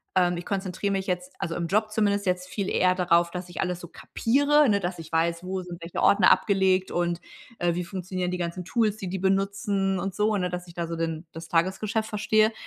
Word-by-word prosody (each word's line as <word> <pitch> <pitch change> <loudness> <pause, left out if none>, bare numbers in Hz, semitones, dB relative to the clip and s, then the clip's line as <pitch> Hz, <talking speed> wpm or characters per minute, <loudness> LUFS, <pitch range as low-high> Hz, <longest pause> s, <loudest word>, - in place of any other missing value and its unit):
ähm, 175 -1 +3
ich 175 - -6
konzentriere 195 0 -2
mich 195 0 -2
jetzt, 180 0 -3
also 165 - -3
im 170 - -2
Job 215 +3 +1
zumindest 205 -2 +1
jetzt 180 0 0
viel 200 -3 -2
eher 185 0 +3
darauf, 170 -1 +3
dass 180 0 -6
ich - - -8
alles 180 -1 -2
so 175 - -8
kapiere, 285 +3 +2
ne, 200 -1 +3
dass 175 -2 -3
ich 160 -1 -9
weiß, 170 +1 +1
wo 185 0 -3
sind 175 -1 -9
welche 170 +1 -4
Ordner 200 -2 +6
abgelegt 190 -2 +3
und, 175 0 -1 0.4
äh, 175 -1 +2
wie 180 - -1
funktionieren 185 0 -3
die 180 - -2
ganzen 175 +1 -3
Tools, 215 -1 +1
die 190 -3 -5
die 190 0 -3
benutzen 195 0 0
und 195 +1 -3
so, 210 0 +2
ne, 180 -1 -1
dass 180 0 -5
ich 170 - -13
da 170 -1 -2
so 165 - -4
den 165 0 -3
das 165 +1 -8
Tagesgeschäft 205 +6 0
verstehe 215 +1 +3
185 Hz, 225 wpm, -26 LUFS, 175-200 Hz, 0.4 s, Ordner